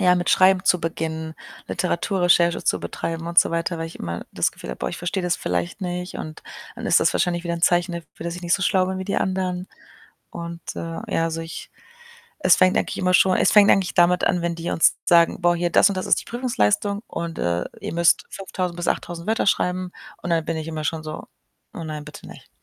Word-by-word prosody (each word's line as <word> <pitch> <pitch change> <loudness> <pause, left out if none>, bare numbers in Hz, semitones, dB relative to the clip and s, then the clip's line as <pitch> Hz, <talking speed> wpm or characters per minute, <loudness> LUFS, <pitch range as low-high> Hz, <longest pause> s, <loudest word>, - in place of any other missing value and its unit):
Ja, 180 -2 +4
mit 175 -1 -2
Schreiben 185 0 +4
zu 180 - +3
beginnen, 160 -1 -4 0.3
Literaturrecherche 175 -1 +1
zu - - +1
betreiben 165 0 -4
und 170 0 +3
so - - +5
weiter, 170 0 -1
weil 165 - -3
ich 165 - -10
immer 85 0 -5
das - - +1
Gefühl 60 - -9
habe: 60 - -7
„Boah, 60 - -2
ich - - -6
verstehe 185 +2 -3
das 180 -1 0
vielleicht 85 -1 -3
nicht 180 0 -4
und 155 0 -8 0.3
dann - - -8
ist - - +5
das - - +2
wahrscheinlich 175 0 0
wieder 170 0 -1
'n 170 - -7
Zeichen 175 0 +3
dafür, 170 -1 -8
dass 170 0 -3
ich 175 - -9
nicht 170 -1 +2
so 195 - -1
schlau 185 0 +2
bin 190 0 -3
wie 190 - -4
die 195 - -2
anderen.“ 185 -1 -1 0.6
Und, 170 0 -7 0.2
äh, 165 0 -5
ja, 165 - +2
also, 165 0 -2
ich 165 0 -8 0.8
es 180 - +7
fängt 185 0 +4
eigentlich - - -2
immer 185 0 +1
schon 185 +1 +5
es - - +3
fängt 205 -1 +7
eigentlich 190 -2 +2
damit 175 0 +4
an, 175 - +1
wenn 170 0 -1
die 170 +1 -4
uns 165 - +3
sagen: 170 -2 +4
„Boah, 175 0 +3
hier 175 0 0
das 175 - +5
und 200 - -3
das 185 - -3
ist - - +4
die - - -11
Prüfungsleistung 205 - 0
und, 170 -1 -5
äh, 85 0 0 0.2
ihr - - -5
müsst 170 0 +3
5.000 185 -2 -4
bis 175 0 -4
8.000 170 0 -4
Wörter 220 -1 +1
schreiben.“ 180 -1 0 0.3
Und - - -5
dann 165 -1 +2
bin 165 +1 -3
ich 160 0 -5
immer 155 -1 -4
schon 155 +1 -2
so: 155 0 -6 0.5
„Oh 170 - -6
nein, 155 -1 -5
bitte 150 0 -11
nicht.“ - - -13
170 Hz, 235 wpm, -23 LUFS, 165-185 Hz, 0.8 s, es